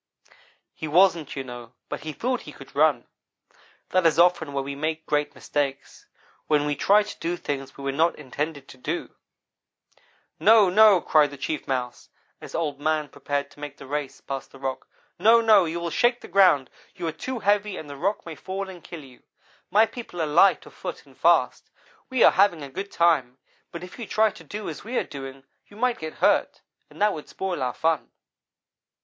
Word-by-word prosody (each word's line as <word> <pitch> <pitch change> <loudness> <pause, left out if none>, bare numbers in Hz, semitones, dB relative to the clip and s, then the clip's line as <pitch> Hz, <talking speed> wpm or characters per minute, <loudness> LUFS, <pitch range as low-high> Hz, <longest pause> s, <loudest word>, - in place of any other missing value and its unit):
"He 155 - -6
wasn't, 170 -1 +3
you 135 - -3
know, 120 -1 -10
but - - -5
he 155 +1 -6
thought 250 - -2
he 150 - -10
could 135 -1 -14
run. 145 -4 +3 0.8
That 185 -2 +3
is 160 - +1
often 170 -3 +3
where 140 -1 -2
we 140 +1 -5
make 155 +3 -3
great 150 0 -1
mistakes 140 -2 -4 0.4
when 150 -1 +2
we 145 0 0
try 205 +8 +4
to 210 - -10
do 175 +1 -2
things 135 -3 -5
we 140 - -9
were 140 - -1
not 160 +5 +2
intended 145 +1 -5
to - - -13
do. 160 +6 -4 1.3
"'No 215 -4 +6
no!' 210 -2 +6
cried 150 -2 +4
the 140 - -10
Chief 150 +2 -4
Mouse, 125 -2 -3 0.3
as - - -9
Old 150 -4 -2
man 155 0 0
prepared 140 0 -3
to - - -18
make 145 -1 -7
the - - -11
race 145 0 -4
past 135 -1 -6
the - - -13
rock. 135 -1 -4 0.3
'No! 225 +5 +6
No! 215 -5 +5
you 165 +1 -3
will 170 -1 -3
shake 240 -1 +2
the - - -10
ground. 175 -8 +4 0.2
You 180 -3 -5
are 165 - -1
too 260 +10 -5
heavy, 205 -1 +1
and 155 - -8
the 145 - -8
rock 200 +9 -2
may 165 - -6
fall 190 +5 -5
and 175 -3 -13
kill 165 -4 -9
you. 130 -2 -16 0.5
My 215 +2 +5
people 225 -5 -9
are 160 - +1
light 170 +6 +4
of - - -14
foot - - -7
and - - -20
fast. - - +2 0.4
We 260 -2 +3
are - - +8
having 175 -5 +3
a 140 - -7
good 195 +7 -6
time, 145 -7 +2 0.3
but 170 - -7
if 180 +6 -11
you 235 - -4
should - - -17
try 220 0 +3
to 165 - -14
do 205 +6 -7
as 160 - -6
we 240 +3 -3
are - - +2
doing 135 -1 -9 0.2
you 205 - -16
might 250 +1 0
get 160 0 -6
hurt, - - +2 0.3
and - - -16
that 210 -1 +3
would 150 - -8
spoil 185 -5 -4
our 125 -1 -1
fun.' 160 -2 0
160 Hz, 210 wpm, -25 LUFS, 140-195 Hz, 1.3 s, are